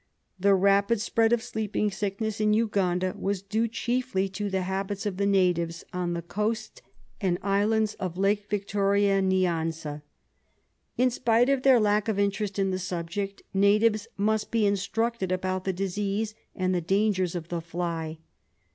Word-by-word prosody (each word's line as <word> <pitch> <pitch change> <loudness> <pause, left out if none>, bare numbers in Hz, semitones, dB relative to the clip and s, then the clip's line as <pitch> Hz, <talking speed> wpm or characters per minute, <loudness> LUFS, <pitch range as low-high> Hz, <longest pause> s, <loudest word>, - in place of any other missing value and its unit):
The 200 +1 +4
rapid 200 +3 +3
spread 225 +1 +2
of 235 -1 +2
sleeping 215 -3 -1
sickness 205 +2 -3
in 210 0 +3
Uganda 185 -5 +1
was 195 -1 -2
due 220 +3 0
chiefly 240 -3 -1
to 200 +2 -3
the 190 -1 -1
habits 195 +2 -3
of 200 -3 -2
the 200 0 +1
natives 175 -4 +1
on 180 -1 -1
the 170 0 -4
coast 215 - -3 0.4
and 180 -3 +1
islands 210 +2 +2
of 180 -3 -4
Lake 205 +1 +1
Victoria 200 -1 +2
Nyanza. 165 -5 0 1.0
In 255 +1 +3
spite 235 +1 +2
of 275 -2 +2
their 260 -2 +6
lack 210 0 +2
of 220 -3 0
interest 200 0 -1
in 195 -1 +1
the 185 - -2
subject, 180 +3 -4
natives 210 +2 +3
must 215 +1 0
be 225 -2 +2
instructed 205 +1 0
about 185 0 -1
the 190 - +1
disease 200 +3 -2 0.2
and 185 0 0
the 180 - 0
dangers 190 0 +1
of 170 -1 -5
the 170 -1 -2
fly. 165 -1 -4
200 Hz, 155 wpm, -27 LUFS, 185-215 Hz, 1.0 s, their